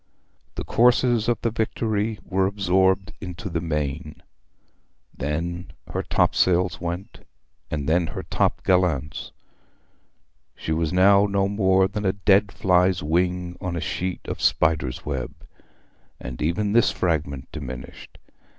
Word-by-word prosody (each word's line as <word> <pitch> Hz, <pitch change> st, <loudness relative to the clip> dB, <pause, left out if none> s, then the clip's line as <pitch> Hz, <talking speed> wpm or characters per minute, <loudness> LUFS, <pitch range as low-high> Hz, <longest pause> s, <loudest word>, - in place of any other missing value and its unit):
The -, -, -4 dB
courses 120 Hz, -1 st, +3 dB
of 120 Hz, -2 st, +1 dB
the 115 Hz, -, +1 dB
Victory 110 Hz, -1 st, -1 dB
were 95 Hz, 0 st, +1 dB
absorbed 95 Hz, -1 st, +1 dB
into 90 Hz, -1 st, -6 dB
the 85 Hz, 0 st, -1 dB
main, 75 Hz, -2 st, -3 dB, 0.9 s
then 85 Hz, +5 st, -3 dB, 0.2 s
her -, -, 0 dB
topsails 90 Hz, -1 st, +2 dB
went, 90 Hz, +6 st, -5 dB, 0.5 s
and 70 Hz, -2 st, -3 dB
then 85 Hz, +1 st, +2 dB
her -, -, -6 dB
top -, -, 0 dB
gallants. 85 Hz, -5 st, 0 dB, 1.2 s
She -, -, -5 dB
was 80 Hz, 0 st, 0 dB
now 100 Hz, +2 st, +5 dB
no 100 Hz, -1 st, +1 dB
more 95 Hz, -2 st, +3 dB
than 105 Hz, +1 st, -4 dB
a 95 Hz, -1 st, +2 dB
dead 100 Hz, 0 st, +3 dB
fly's 90 Hz, -1 st, +2 dB
wing 90 Hz, +2 st, 0 dB
on 90 Hz, -3 st, -3 dB
a -, -, -2 dB
sheet 90 Hz, +3 st, -3 dB
of -, -, -5 dB
spider's 75 Hz, -6 st, +1 dB
web; 70 Hz, -4 st, -4 dB, 0.8 s
and 60 Hz, -1 st, -7 dB
even 100 Hz, +7 st, 0 dB
this 120 Hz, 0 st, +5 dB
fragment 75 Hz, -6 st, -2 dB
diminished. 65 Hz, -5 st, -8 dB
90 Hz, 130 wpm, -24 LUFS, 80-100 Hz, 1.2 s, now